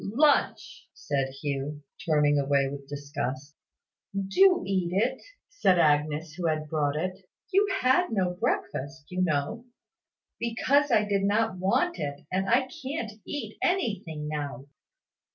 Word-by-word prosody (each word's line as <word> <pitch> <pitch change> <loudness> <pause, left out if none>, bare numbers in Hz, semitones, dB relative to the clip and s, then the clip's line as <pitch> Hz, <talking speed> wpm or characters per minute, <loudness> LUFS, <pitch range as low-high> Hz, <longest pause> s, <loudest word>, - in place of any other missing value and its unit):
"Lunch!" 285 +9 +1
said 135 -2 -1
Hugh, 140 +1 -4 0.2
turning 150 -3 +3
away 140 0 +2
with 140 0 -7
disgust. 140 -1 -5 0.6
"Do 360 - +4
eat 185 -3 0
it," 230 +8 0 0.3
said 195 - +3
Agnes, 150 0 +2
who 175 -2 -2
had 155 -1 -1
brought 150 -2 0
it. 185 +3 -4 0.2
"You 400 +2 +4
had 305 +8 +3
no 185 -4 +1
breakfast, 150 -3 -2
you 180 0 -1
know." 170 +8 -1 0.7
"Because 270 +5 +2
I 220 -4 +4
did 200 -1 +1
not 205 -1 +1
want 340 - +1
it; 140 0 -4
and 190 +1 0
I 255 +2 +3
can't 265 -4 -3 0.2
eat 290 - -5
anything 200 - -1
now." 145 -4 -4
180 Hz, 135 wpm, -27 LUFS, 145-225 Hz, 0.7 s, Do